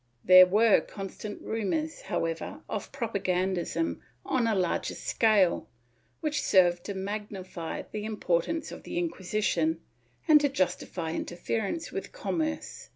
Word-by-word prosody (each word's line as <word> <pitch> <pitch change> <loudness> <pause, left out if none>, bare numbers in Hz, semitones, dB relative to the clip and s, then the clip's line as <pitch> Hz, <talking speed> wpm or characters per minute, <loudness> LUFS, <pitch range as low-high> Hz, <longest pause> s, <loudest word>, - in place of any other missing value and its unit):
^ - - -45 0.2
There 185 0 +10
were 210 +3 +5
constant 200 +1 -7
rumors, 295 +9 -2
however, 165 0 -3
of - - -4
propagandism 185 -8 -1 0.2
on 245 -3 +1
a 220 - +2
larger 180 -3 0
scale 210 -6 +2 0.5
which 305 -2 0
served 175 -2 +4
to 200 - -4
magnify 190 -3 -5
the 210 -1 -4
importance 215 - -1
of - - -8
the - - -6
Inquisition 175 -1 0 0.5
and 300 -2 +7
to 285 - +3
justify 180 -7 -1
interference 220 - -3
with - - -5
commerce. 320 -11 -3
195 Hz, 125 wpm, -28 LUFS, 175-230 Hz, 0.5 s, There